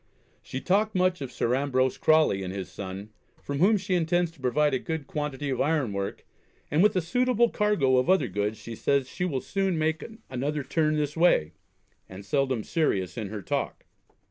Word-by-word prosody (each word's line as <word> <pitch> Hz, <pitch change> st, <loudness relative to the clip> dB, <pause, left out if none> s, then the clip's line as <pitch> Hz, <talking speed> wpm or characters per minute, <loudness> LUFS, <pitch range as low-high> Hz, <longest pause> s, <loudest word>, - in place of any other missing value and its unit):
She 130 Hz, -, -6 dB
talked 205 Hz, +7 st, +1 dB
much 185 Hz, -3 st, +2 dB
of 135 Hz, -2 st, -5 dB
Sir 120 Hz, 0 st, 0 dB
Ambrose 130 Hz, -1 st, +1 dB
Crawley 155 Hz, -11 st, +4 dB
and 95 Hz, -1 st, -4 dB
his 95 Hz, -2 st, -6 dB
son, 95 Hz, +2 st, -7 dB, 0.3 s
from 140 Hz, -1 st, -3 dB
whom 205 Hz, +6 st, +5 dB
she 190 Hz, 0 st, -3 dB
intends 175 Hz, 0 st, +1 dB
to 165 Hz, -, -23 dB
provide 140 Hz, +3 st, +2 dB
a 130 Hz, -, +1 dB
good 160 Hz, 0 st, -4 dB
quantity 145 Hz, -2 st, -3 dB
of 130 Hz, -, -1 dB
iron 145 Hz, -8 st, +1 dB
work; 100 Hz, 0 st, -4 dB, 0.5 s
and, 150 Hz, -, +3 dB
with 210 Hz, +1 st, +4 dB
a 185 Hz, -, +2 dB
suitable 240 Hz, +6 st, +2 dB
cargo 165 Hz, -12 st, +2 dB
of 125 Hz, -, +1 dB
other 190 Hz, 0 st, +4 dB
goods, 105 Hz, +3 st, -2 dB
she 115 Hz, -, -8 dB
says 140 Hz, +3 st, +1 dB
she 180 Hz, -, -3 dB
will 140 Hz, -8 st, -1 dB
soon 195 Hz, -3 st, -1 dB
make 160 Hz, +1 st, 0 dB, 0.2 s
another 140 Hz, +3 st, -2 dB
turn 155 Hz, +3 st, +1 dB
this 150 Hz, -1 st, -1 dB
way; 160 Hz, -, +3 dB, 0.6 s
and 95 Hz, +1 st, -10 dB
seldom 130 Hz, +1 st, 0 dB
serious 100 Hz, -, 0 dB
in 110 Hz, -5 st, -4 dB
her 105 Hz, -1 st, -6 dB
talk. -, -, -3 dB
145 Hz, 195 wpm, -27 LUFS, 125-175 Hz, 0.6 s, whom